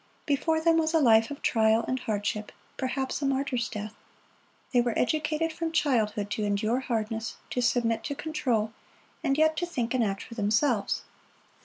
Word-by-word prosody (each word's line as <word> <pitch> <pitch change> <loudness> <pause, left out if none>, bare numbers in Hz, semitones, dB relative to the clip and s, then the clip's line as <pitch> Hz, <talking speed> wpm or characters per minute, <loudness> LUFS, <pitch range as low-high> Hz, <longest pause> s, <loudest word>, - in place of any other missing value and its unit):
Before 310 +3 +1
them 330 0 +3
was 320 0 +1
a - - +6
life 225 -5 +5
of 285 - -8
trial 220 0 +3
and 260 - -1
hardship, 210 -1 -2 0.2
perhaps 265 +1 -2
a - - 0
martyr's 265 -3 0
death. 210 0 -5 0.8
They 245 - +5
were 240 -2 -1
educated 310 +3 0
from 330 0 -3
childhood 220 -9 +1
to 215 - -1
endure 210 +4 +1
hardness, 225 -3 -2 0.2
to 250 - 0
submit 230 -2 +1
to 285 - -3
control, 255 -9 -1 0.5
and 275 -3 +1
yet 315 0 +4
to 350 - 0
think 245 -8 -2
and 255 -2 +2
act 195 -2 -2
for - - -10
themselves. 220 +1 +1
245 Hz, 170 wpm, -28 LUFS, 220-295 Hz, 0.8 s, a